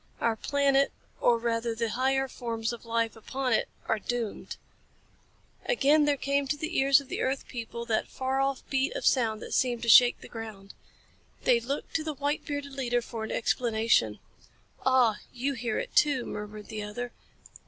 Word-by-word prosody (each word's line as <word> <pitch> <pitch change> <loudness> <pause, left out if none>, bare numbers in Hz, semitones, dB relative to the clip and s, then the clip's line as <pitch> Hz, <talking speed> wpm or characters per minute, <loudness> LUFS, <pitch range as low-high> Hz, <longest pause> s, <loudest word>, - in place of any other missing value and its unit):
Our 230 -1 +1
planet, 275 +3 +2 0.3
or 235 - +4
rather 230 0 -1
the 230 0 -1
higher 265 +2 +1
forms 230 -2 -3
of 235 - -9
life 230 0 0
upon 255 +3 -2
it, - - +1 0.2
are 220 - +1
doomed." 235 0 -4 1.1
Again 300 - +4
there 290 -1 +2
came 280 0 0
to 295 +2 -1
the 315 +3 -4
ears 275 +1 +6
of 280 - -11
the - - -3
earth 265 +1 -1
people 235 -1 -6
that 225 -2 0
far 265 +1 -2
off 275 -1 -1
beat 270 +1 0
of - - -3
sound 225 -4 +2
that - - -7
seemed 240 -2 +1
to 235 - 0
shake 245 +2 +7
the - - -10
ground. 215 -4 -8 0.7
They 240 - +4
looked 270 +5 -4
to 315 - -4
the 310 -1 -4
white 285 +2 -1
bearded 285 -1 -4
leader 245 -3 0
for 225 -2 -5
explanation. 220 - +1 0.7
"Ah, 255 -5 +4
you 265 +3 -2
hear 235 -3 -2
it - - -4
too," 280 -5 +3
murmured 210 0 -7
the 215 -1 -4
other. 240 +4 -5
245 Hz, 175 wpm, -28 LUFS, 225-275 Hz, 1.1 s, shake